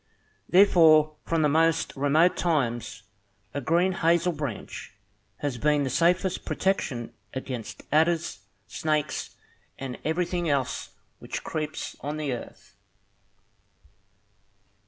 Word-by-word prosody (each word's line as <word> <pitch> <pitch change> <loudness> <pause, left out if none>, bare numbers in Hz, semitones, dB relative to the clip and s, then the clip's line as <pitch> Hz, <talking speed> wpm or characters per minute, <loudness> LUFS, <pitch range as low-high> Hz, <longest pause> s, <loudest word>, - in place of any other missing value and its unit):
Therefore, 160 -5 +6
from 165 -1 +1
the - - +5
most 160 +2 +2
remote 150 +6 +3
times, 120 -10 -1 0.5
a 145 - -2
green 170 +7 +2
hazel 170 -1 +2
branch 140 -9 -6 0.5
has 140 -5 -2
been 150 +1 +2
the 130 - -2
safest 180 +4 +2
protection 145 -11 -1 0.2
against 125 -4 -6
adders, 160 0 +2 0.3
snakes, 155 -1 -2 0.4
and 130 -2 -6
everything 175 +1 -1
else 140 -3 -1 0.3
which - - -6
creeps 155 -1 -4
on 145 +3 -4
the 150 -4 -2
earth. 120 - -9
155 Hz, 105 wpm, -26 LUFS, 140-170 Hz, 0.5 s, Therefore